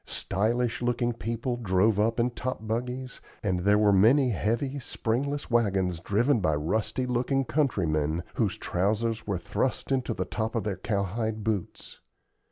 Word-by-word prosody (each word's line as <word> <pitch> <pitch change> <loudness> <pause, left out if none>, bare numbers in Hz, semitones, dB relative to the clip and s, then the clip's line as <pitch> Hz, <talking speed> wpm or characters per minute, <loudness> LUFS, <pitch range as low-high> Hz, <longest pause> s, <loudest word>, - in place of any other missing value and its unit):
Stylish 115 +5 -1
looking 120 0 0
people 115 +2 -3
drove 105 -1 +2
up 115 +2 +2
in 120 +1 +2
top 125 -2 -4
buggies, 125 +3 -3 0.2
and 95 -4 0
there 100 +3 +4
were 105 -1 +4
many 120 +7 +5
heavy, 120 +7 -1
springless 135 +3 -2
wagons 95 -7 +1
driven 115 - +2
by 80 -6 +1
rusty 105 - -1
looking 125 +2 0
countrymen, 85 - 0
whose - - 0
trousers 110 +5 -1
were 100 -3 0
thrust 100 +10 -2
into 130 -4 0
the 90 - -2
top 110 +5 -3
of 115 - 0
their 100 -2 -2
cowhide 105 +2 -2
boots. 105 -5 -4
110 Hz, 150 wpm, -28 LUFS, 100-125 Hz, 0.2 s, many